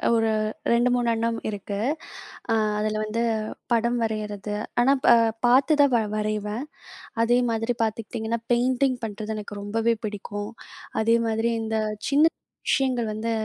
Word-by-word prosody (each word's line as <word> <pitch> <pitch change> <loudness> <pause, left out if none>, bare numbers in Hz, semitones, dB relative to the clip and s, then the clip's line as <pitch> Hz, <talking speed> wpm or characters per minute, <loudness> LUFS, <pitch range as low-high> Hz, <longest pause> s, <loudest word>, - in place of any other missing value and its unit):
ஒரு 225 -1 +2 0.4
2, 240 +1 +4
3 245 -1 0
அண்ணம் 230 0 -1
இருக்கு. 200 -1 -4 0.7
அ - - +4 0.3
அதில 215 0 -1
வந்து 230 +2 -1 0.5
படம் 235 +1 +2
வரையிறது, 210 -1 -3 0.3
ஆனா 265 +3 +5
ப - - +3 0.4
பார்த்து 265 +5 +5
தான் 280 -3 +4
வ - - +4 0.2
வரைவேன். 215 +4 -2 0.6
அதே 240 +2 +4
மாதிரி 225 +2 -1
பார்த்துக்கிட்டீங்கன்னா, 225 +1 -3
பெயிண்டிங் 255 +1 +2
பண்றது 215 0 -4
எனக்கு 205 -1 -7
ரொம்பவே 225 +3 +1
பிடிக்கும். 205 0 -5 0.5
அதே 230 +1 +4
மாதிரி 225 +1 +1
இந்த 220 0 -1 0.3
சின்ன 290 +3 +5 0.4
விஷயங்கள் 255 -4 +1
வந்து 220 +2 -2
225 Hz, 135 wpm, -25 LUFS, 215-240 Hz, 0.7 s, ஆனா